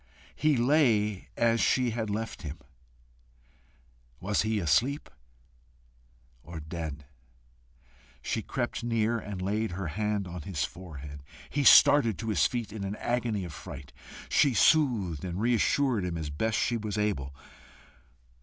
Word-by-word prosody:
He 150 -3 +2
lay 115 -7 +2
as 115 0 +2
she 125 -2 +2
had 110 -1 -3
left 110 +2 -4
him. 75 -1 -6 1.6
Was 100 +2 0
he 110 0 0
asleep, 115 - +1 1.3
or 85 +3 -8
dead? 75 -2 -6 1.2
She - - -2
crept - - -3
near 115 0 0
and 105 -3 -7
laid 105 0 -1
her 90 -2 -4
hand 105 +2 -2
on 90 -1 -7
his 75 -2 -3
forehead. 75 -5 -8 0.3
He 145 - 0
started 125 -7 +7
to 115 - -4
his 95 -8 +3
feet 120 -4 -4
in 105 -3 -5
an 100 +1 -3
agony 120 -5 -1
of 85 - -8
fright. 70 -2 -10 0.3
She 140 -5 +3
soothed 115 - +3
and 90 0 -4
reassured 120 0 +2
him 90 -2 -3
as 75 -3 -4
best 110 +10 -1
she 120 - +1
was 105 -2 -4
able. 70 -11 -1
105 Hz, 135 wpm, -29 LUFS, 85-115 Hz, 1.6 s, started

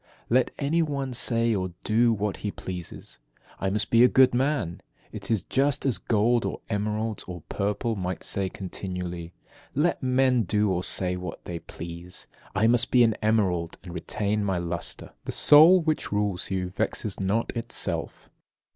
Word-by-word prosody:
15. 120 - +2
Let 130 - +3
any 155 +4 +1
one 140 -4 -2
say 115 -1 +1
or 95 -3 -2
do 115 +2 +3
what 105 -2 -1
he 105 - -3
pleases, 90 -4 -7 0.4
I 95 - 0
must 105 +2 -1
be 115 +1 +6
a - - +8
good 130 0 +5
man. 130 - 0 0.3
It 100 -3 -8
is 110 -4 +1
just 140 +1 0
as 130 -5 +2
gold, 115 +2 +2
or - - -3
emeralds, 105 +1 -2
or 90 -3 -7
purple 105 +3 -1
might 90 -3 -4
say 95 -1 -1
continually: 90 -3 -6 0.4
"Let 155 +5 +1
men 130 -1 +3
do 105 0 +1
or 90 -1 -1
say 90 -1 0
what 90 -3 -7
they 85 -1 -5
please, 85 +2 -7 0.3
I 100 +3 +3
must 120 +1 +3
be 125 -1 +5
an 115 -1 +4
emerald, 95 -6 +1
and 90 -2 -9
retain 105 +3 -1
my 95 -2 0
lustre." 85 0 -3
16. - - -45
The - - -3
soul 165 +5 +8
which 155 -1 -1
rules 105 -3 -1
you 90 -1 -2
vexes 100 +1 -2
not 100 +6 0
itself. 115 - -3
105 Hz, 175 wpm, -26 LUFS, 90-120 Hz, 0.4 s, a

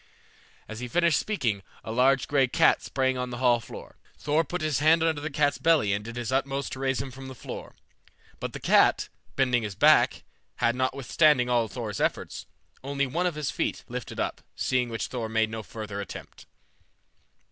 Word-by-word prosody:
As 110 0 -7
he 125 - -4
finished 170 +2 +3
speaking, 120 - -1 0.2
a - - -6
large 130 +3 +3
gray 140 -3 +3
cat - - +4
sprang 130 -1 0
on 125 0 -2
the 120 - -5
hall 120 -1 +3
floor. 115 - -11 0.2
Thor 150 +2 +1
put 175 +4 -4
his 155 -4 0
hand 160 +2 +4
under 160 -3 +1
the 155 - -3
cat's 145 -1 +1
belly 160 -12 +3
and 100 +1 -2
did 115 +2 -8
his 120 -1 -3
utmost 135 +1 -1
to 130 - -7
raise 135 0 0
him 135 -1 -4
from 135 +1 -9
the 130 - -8
floor, - - -8 0.6
but - - -4
the - - -6
cat, - - +4 0.3
bending 125 -3 +2
his 105 -3 -5
back, - - +4 0.3
had, 120 +1 +1
notwithstanding 130 +1 +2
all 120 -2 +2
Thor's 110 -2 -5
efforts, - - -2 0.4
only 140 0 -1
one 170 +7 0
of 175 - -2
his 150 -2 -2
feet - - -2
lifted - - -6
up, - - -2
seeing 125 -1 0
which 115 -1 -3
Thor 115 -3 -4
made 110 0 +1
no 110 0 -4
further 105 -2 -6
attempt. 100 - -10
130 Hz, 190 wpm, -27 LUFS, 115-145 Hz, 0.6 s, cat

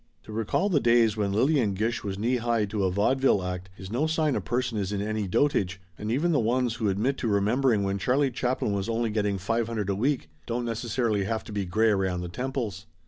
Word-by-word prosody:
To 110 - -10
recall 115 - 0
the 175 -8 +3
days 115 -3 +4
when 105 -2 0
Lillian 115 -1 +2
Gish 115 +4 -1
was 95 -1 -3
knee 120 +5 +1
high 115 -2 +1
to 100 -1 -1
a - - +2
vaudeville 105 +1 +2
act 90 0 -4
is 95 +2 -9
no 135 +7 +1
sign 155 -3 +1
a - - -1
per 120 - -1
son 120 -4 -2
is 100 -1 -2
in 100 - -1
any 105 0 -2
dotage, 95 -5 +1 0.2
and 105 +5 -4
even 155 +8 +1
the 150 - +3
ones 120 +1 +1
who 110 -3 0
admit 115 +8 0
to 120 - -1
remembering 110 +2 +2
when 100 0 -1
Charlie 130 +5 +2
Chaplin 125 -3 -1
was 100 +2 -2
only 115 -1 0
getting 105 -2 0
five 115 +5 -1
hundred 105 -4 -2
a - - 0
week 130 - 0 0.2
don't 120 +1 -2
necessarily 115 -2 -1
have 110 +1 -2
to - - -10
be 100 -2 -2
gray 110 +5 +2
around 95 -3 0
the 90 - -5
temples. 115 -3 -4
110 Hz, 235 wpm, -27 LUFS, 100-125 Hz, 0.2 s, days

